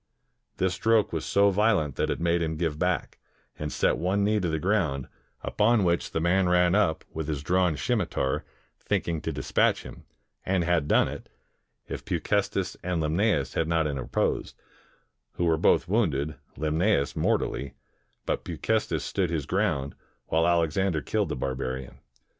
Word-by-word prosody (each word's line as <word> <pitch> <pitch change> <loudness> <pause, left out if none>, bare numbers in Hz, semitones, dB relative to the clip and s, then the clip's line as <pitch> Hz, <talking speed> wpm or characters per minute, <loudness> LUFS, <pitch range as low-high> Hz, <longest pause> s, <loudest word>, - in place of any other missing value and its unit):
This 95 -1 +1
stroke 110 +1 +2
was 80 - -2
so 100 0 +4
\'iolent 95 - +2
that - - -1
it - - -1
made 85 0 +1
him 80 -1 -2
give 80 -2 -2
back, 90 -1 -1 0.4
and 75 0 -3
set - - +1
one 95 +3 +1
knee 105 +1 +2
to 90 -3 -1
the 80 - 0
ground, 80 - 0 0.4
upon 110 0 +2
which 85 -1 +1
the - - -2
man 90 +2 +2
ran 90 0 +4
up 95 -6 +2
with 80 -1 -4
his 75 -3 -3
drawn 90 -1 +2
scimitar, 100 - -1 0.4
thinking 80 -2 -1
to 80 - -3
dispatch 70 -3 +1
him, - - -11 0.4
and 95 -2 +1
had 85 -3 +1
done - - +4
it, - - -8 0.6
if - - -6
Peucestes - - -1
and 90 -2 -1
Limnaeus 80 - +1
had 80 - 0
not 80 -1 +1
interposed, 70 -4 -1 0.8
who 85 - -1
were 80 -1 +3
both 80 - +3
wounded, 80 -8 +1 0.2
Limnasus 80 0 +1
mortally, 70 -1 -1 0.5
but - - -1
Peu - - -6
cestes - - 0
stood 95 -3 -1
his 80 -4 -2
ground, 70 +1 0 0.4
while 80 +1 +3
Alexander 85 0 +1
killed 105 -5 0
the - - -2
bar 65 +1 -2
barian. 65 0 -5
85 Hz, 165 wpm, -27 LUFS, 75-95 Hz, 0.8 s, so